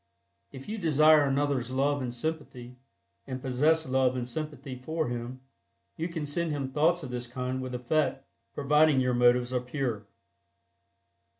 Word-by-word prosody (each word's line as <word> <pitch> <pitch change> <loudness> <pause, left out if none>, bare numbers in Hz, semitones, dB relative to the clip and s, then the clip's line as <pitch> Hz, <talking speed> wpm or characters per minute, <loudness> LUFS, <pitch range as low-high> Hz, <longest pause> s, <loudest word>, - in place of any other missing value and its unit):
If 135 -1 -10
you 220 +1 -4
desire 155 -3 +5
another's 135 -3 0
love 140 +2 +1
and 125 -2 -3
sympathy, 125 -2 -5 0.5
and 130 -1 -4
possess 150 +6 +2
love 130 -1 +2
and 125 -1 -3
sympathy 140 -1 -5
for 155 +3 -3
him, 120 +2 -5 0.5
you 165 - -2
can 165 -3 -4
send 165 +3 -2
him 140 -3 -2
thoughts 165 +4 +2
of 130 - -6
this 125 0 -4
kind 125 +1 -3
with 130 -1 -5
effect, 135 +2 0 0.3
providing 150 0 +4
your 125 -1 +1
motives 120 +1 +3
are 125 - +1
pure. 125 -5 -3
135 Hz, 155 wpm, -28 LUFS, 125-150 Hz, 0.5 s, desire